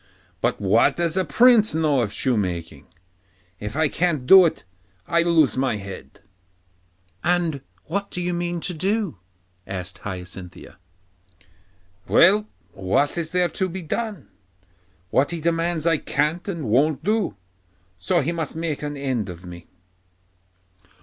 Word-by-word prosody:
But - - 0
what 105 +3 +3
does 170 -1 0
a 190 - +2
prince 230 -3 +4
know 150 -5 +2
of 105 -4 -2
shoemaking? 85 - -2 0.7
If 105 +4 -6
I 155 0 +3
can't 155 -4 -1
do 190 +6 +9
it, - - -5 0.4
I 170 - +3
lose 160 -8 +3
my 130 -4 +1
head.' 100 -1 -10 1.0
'And 170 -5 +1 0.2
what 200 +4 -3
do 180 - -5
you 180 0 -1
mean 175 0 -2
to 180 - -2
do?' 190 - -1 0.5
asked 90 -2 -6
Hyacinthia. 90 -2 -8 1.3
'Well, 205 +4 +5 0.2
what 95 +10 0
is 165 -2 -2
there 180 0 +2
to 190 +3 -2
be 185 +1 -6
done? 205 - -4 0.8
What 135 +2 +2
he 170 -1 -3
demands 165 0 0
I 165 -3 +3
can't 150 +6 -1
and 170 - -4
won't 140 +6 +2
do, 205 - 0 0.6
so 90 - +1
he 150 +5 -1
must 165 -3 -3
just 160 - -6
make 160 -3 -3
an 145 -1 -4
end 130 -7 -2
of 90 0 -9
me. 85 -1 -11
155 Hz, 145 wpm, -23 LUFS, 115-175 Hz, 1.3 s, do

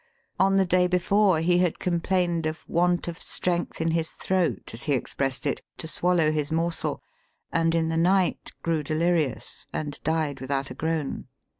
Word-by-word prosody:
On 195 +1 +4
the 195 -1 +4
day 180 0 +3
before, 185 0 +3
he 175 +1 +3
had 180 -3 +1
complained 175 -1 0
of 155 +2 -6
want 175 +1 +1
of 170 0 -5
strength 175 -1 -2
in 165 0 +1
his 160 0 -1
throat, 185 -3 -1
as 115 - -7
he 145 - +1
expressed 135 +1 -1
it, 140 - -1 0.2
to 160 - -3
swallow 165 0 +2
his 150 -1 -1
morsel, 165 +1 -1 0.5
and 165 0 +2
in 165 -1 +1
the 165 - -1
night 185 +2 +2
grew 165 -2 +1
delirious 155 -2 -1
and 145 -2 -4
died 155 -4 -1
without 135 0 -2
a - - -4
groan." 160 0 -2
165 Hz, 170 wpm, -26 LUFS, 155-180 Hz, 0.5 s, On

